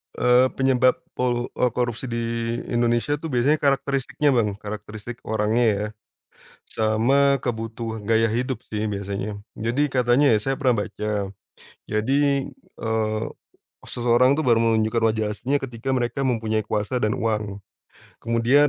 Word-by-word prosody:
Eee, 125 Hz, +1 st, +4 dB
penyebab 130 Hz, -1 st, +3 dB, 0.2 s
polu 120 Hz, -1 st, 0 dB
eee, 125 Hz, -, +3 dB
korupsi 120 Hz, 0 st, -2 dB
di 115 Hz, 0 st, -2 dB, 0.5 s
Indonesia 120 Hz, +4 st, +1 dB
tuh 160 Hz, -, -5 dB
biasanya 130 Hz, +5 st, +3 dB
karakteristiknya 140 Hz, +1 st, +1 dB
Bang, 105 Hz, -4 st, +1 dB
karakteristik 105 Hz, +2 st, -7 dB
orangnya 110 Hz, +2 st, +1 dB
ya, 105 Hz, +1 st, -2 dB, 0.8 s
sama 130 Hz, +6 st, +2 dB
kebutuhan 115 Hz, -1 st, -4 dB
gaya 115 Hz, 0 st, +4 dB
hidup 125 Hz, +2 st, -2 dB
sih 110 Hz, 0 st, -3 dB
biasanya. 100 Hz, +1 st, -4 dB, 0.2 s
Jadi 130 Hz, +6 st, 0 dB
katanya 125 Hz, +2 st, +4 dB
ya 105 Hz, -, +3 dB
saya 135 Hz, +2 st, -1 dB
pernah 125 Hz, -7 st, +1 dB
baca, 105 Hz, -2 st, -3 dB, 0.6 s
jadi, 110 Hz, +6 st, +1 dB, 0.6 s
eee, 110 Hz, -1 st, 0 dB, 0.6 s
seseorang 125 Hz, +2 st, +3 dB
tuh -, -, +1 dB
baru 115 Hz, -2 st, +5 dB
menunjukkan 110 Hz, 0 st, +2 dB
wajah 110 Hz, -1 st, -1 dB
aslinya 135 Hz, +7 st, 0 dB
ketika 125 Hz, 0 st, -4 dB
mereka 125 Hz, +2 st, -1 dB
mempunyai 110 Hz, -3 st, 0 dB
kuasa 105 Hz, +5 st, -1 dB
dan 105 Hz, -1 st, +1 dB
uang. 105 Hz, -3 st, -1 dB, 0.6 s
Kemudian 120 Hz, +6 st, +3 dB
115 Hz, 130 wpm, -23 LUFS, 110-130 Hz, 0.8 s, baru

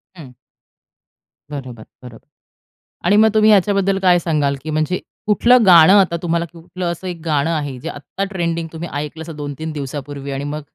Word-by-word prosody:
हं. 150 Hz, -8 st, -12 dB, 1.2 s
बरोबर, 130 Hz, -6 st, -7 dB, 0.2 s
बरोबर. 120 Hz, -2 st, -13 dB, 0.8 s
आणि 205 Hz, -, +4 dB
मग 220 Hz, +1 st, +6 dB
तुम्ही 215 Hz, 0 st, +4 dB
याच्याबद्दल 195 Hz, -1 st, +2 dB
काय 180 Hz, -2 st, +4 dB
सांगाल, 150 Hz, -5 st, 0 dB
की 155 Hz, -, -6 dB
म्हणजे 155 Hz, +4 st, -1 dB, 0.3 s
कुठलं 235 Hz, +3 st, +4 dB
गाणं 175 Hz, -1 st, +8 dB
आता 175 Hz, -3 st, +1 dB
तुम्हाला 170 Hz, -1 st, -1 dB
कुठलं 175 Hz, +1 st, -5 dB
असं 170 Hz, +2 st, -7 dB
एक 175 Hz, -2 st, -6 dB
गाणं 150 Hz, -1 st, +1 dB
आहे, 145 Hz, -5 st, -3 dB
जे -, -, -6 dB
आत्ता 145 Hz, +7 st, -6 dB
ट्रेंडिंग 170 Hz, -2 st, -2 dB
तुम्ही 165 Hz, +1 st, -6 dB
ऐकलं 150 Hz, +2 st, -5 dB
असं 160 Hz, -1 st, -9 dB
2-3 150 Hz, +2 st, -6 dB
दिवसांपूर्वी 140 Hz, -1 st, -6 dB
आणि 135 Hz, +1 st, -4 dB
मग 150 Hz, +1 st, -4 dB
165 Hz, 170 wpm, -18 LUFS, 145-180 Hz, 1.2 s, गाणं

